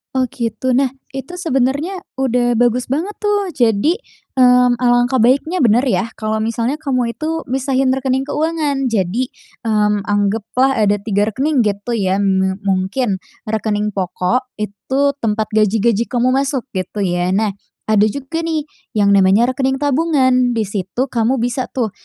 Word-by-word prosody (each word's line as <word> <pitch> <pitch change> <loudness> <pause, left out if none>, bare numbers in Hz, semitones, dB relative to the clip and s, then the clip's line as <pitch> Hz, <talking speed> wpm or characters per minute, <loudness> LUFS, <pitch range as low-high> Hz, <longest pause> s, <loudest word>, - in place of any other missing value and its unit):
Oh, 260 - +2
gitu. 235 +2 -2
Nah, 265 +2 +3 0.2
itu 270 +6 -7
sebenarnya, 305 +2 -1 0.2
udah 245 -2 +1
bagus 245 +1 +1
banget 315 +10 -1
tuh. 410 -3 0
Jadi, 240 - +2 0.4
mmm, 250 -1 +5
alangkah 245 +1 +2
baiknya 275 +10 +2
benar 240 -2 +4
ya. 220 -6 +1
Kalau 215 0 -2
misalnya 230 +6 -1
kamu 255 -6 -1
itu 320 +5 -3
misahin 265 0 +1
rekening 265 0 0
keuangan. 295 -2 -1
Jadi, 225 +2 0 0.4
mmm, 210 -2 +1
anggaplah 210 +6 +1
ada 205 -1 +3
3 205 -1 +1
rekening 270 +6 0
gitu 205 +3 -3
ya, 190 -1 +1
me 190 -1 +1
mungkin 195 +2 0 0.2
rekening 210 -1 -1
pokok 195 +6 -2
itu 260 +7 -1
tempat 215 -2 -1
gaji-gaji 220 +1 +2
kamu 250 +1 +1
masuk 270 -1 0
gitu 190 +2 -3
ya. 180 0 0
Nah, 215 0 +1 0.3
ada 215 -1 +3
juga 280 +7 -4
nih 325 -2 -1 0.3
yang 200 -1 +3
namanya 200 +5 +4
rekening 265 +1 0
tabungan. 260 -4 +2
Di 225 - +1
situ 205 +6 -3
kamu 235 +2 +1
bisa 245 +1 -1
tuh, 235 -5 0
245 Hz, 145 wpm, -17 LUFS, 210-270 Hz, 0.4 s, mmm